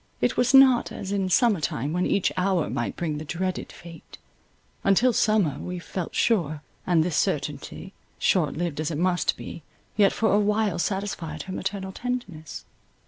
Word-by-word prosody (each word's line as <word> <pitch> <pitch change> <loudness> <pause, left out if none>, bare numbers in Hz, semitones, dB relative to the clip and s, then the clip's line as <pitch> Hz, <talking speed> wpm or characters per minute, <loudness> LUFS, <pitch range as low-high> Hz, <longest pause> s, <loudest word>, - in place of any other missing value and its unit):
It - - +1
was 250 0 +2
not 265 -3 +6
as 195 - -6
in 195 -2 0
summer 215 0 +3
time, 145 +1 -2
when 180 +1 +1
each 200 - +1
hour 185 -3 +1
might 120 - -2
bring 155 -4 -3
the - - -6
dreaded 180 +4 -3
fate—until 195 +6 -3
summer, 215 - +2
we 180 0 -5
felt 180 0 -5
sure; 155 -10 +1 0.2
and 170 -3 +4
this 170 -2 -2
certainty, 150 +6 -2 0.2
short 155 -7 +1
lived 170 -3 -2
as 155 0 -1
it 155 - -3
must 175 +1 +1
be, 170 - -8 0.3
yet 205 -2 +5
for 220 -2 +1
awhile 210 -2 +2
satisfied 180 -5 -3
her 190 - -7
maternal 190 0 -4
tenderness. 205 - -5
185 Hz, 160 wpm, -25 LUFS, 160-205 Hz, 0.3 s, not